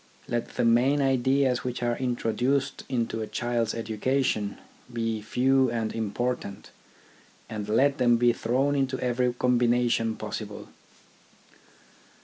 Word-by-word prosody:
Let 120 -1 -3
the - - +1
main 125 +5 +4
ideas 130 -1 +2
which 125 -1 -4
are 120 0 +1
intro 120 -3 -1
duced 135 +3 0
into 115 -3 -1
a 110 - -3
child's 120 -1 -1
education 115 -1 -1 0.3
be 115 -2 -2
few 130 +4 +2
and 115 -2 -2
im 110 -3 -2
portant, 120 -5 -3 0.8
and 105 -1 -5
let 135 +6 +3
them 120 -2 +4
be 120 0 +4
thrown 130 +5 0
into 135 -1 0
every 125 0 +1
combination 120 -2 +1
possible. - - -6
120 Hz, 125 wpm, -27 LUFS, 115-130 Hz, 0.8 s, main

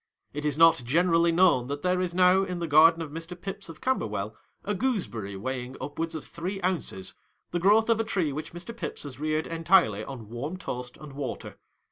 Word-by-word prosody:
It 150 +1 -4
is 150 -1 0
not 165 -4 +6
generally 170 +5 +3
known 165 -8 +4
that 145 +1 -4
there 180 0 +2
is 175 -1 -2
now 185 +1 +5
in 185 -2 -3
the 170 - -2
garden 165 +2 +6
of 150 - -8
Mr. 165 +3 -7
Pips, 195 -2 -6
of 165 - -11
Camberwell, 110 - -1 0.3
a 210 - 0
gooseberry 180 - -2
weighing 130 +4 -4
up 145 - -7
wards 165 0 -2
of 155 - -5
three 185 +4 -5
ounces, 170 - -1 0.4
the 175 - 0
growth 210 +5 +4
of 230 -1 +3
a - - +2
tree 175 -9 -1
which 155 +2 -5
Mr. 175 +7 -8
Pips - - -5
has 140 -3 -8
reared 155 +1 0
entirely 165 - +3
on 120 -3 -8
warm 140 +10 -5
toast 125 -7 -6
and 150 -3 -11
water. 135 -3 -6
165 Hz, 205 wpm, -27 LUFS, 135-180 Hz, 0.4 s, not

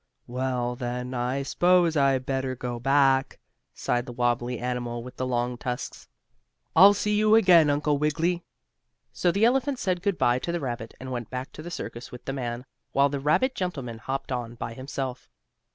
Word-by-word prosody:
"Well, 125 -1 -2
then, 125 0 -4
I 125 +2 -1
s'pose 175 +2 +3
I'd 135 -3 +2
better 130 -1 -1
go 120 -1 -4
back," 135 +1 +3 0.4
sighed 120 0 -1
the - - -5
wobbly 120 0 0
animal 120 -1 -3
with 125 +1 -11
the 130 - -2
long 120 -1 -1
tusks. 125 0 -5 0.7
"I'll 195 +4 +8
see 210 +1 0
you 215 +1 +5
again, 175 -8 +6
Uncle 145 0 +1
Wiggily." 165 +4 0 0.7
So 175 - +2
the 200 +5 +3
elephant 265 +3 +2
said 185 -6 -1
good 200 -1 0
bye 120 +1 +3
to 170 - -3
the 175 - -1
rabbit, 120 -5 -5
and 130 0 -7
went 120 -3 -4
back 130 +1 -5
to - - -10
the 170 - -7
circus 120 -6 -7
with 125 - -10
the 135 - -3
man, 125 -1 -4 0.3
while 140 +1 +4
the 140 0 -3
rabbit 205 - +2
gentleman 135 - -4
hopped 135 +3 -4
on 120 -2 -3
by 115 0 -5
himself. 130 0 -5
130 Hz, 185 wpm, -26 LUFS, 125-165 Hz, 0.7 s, I'll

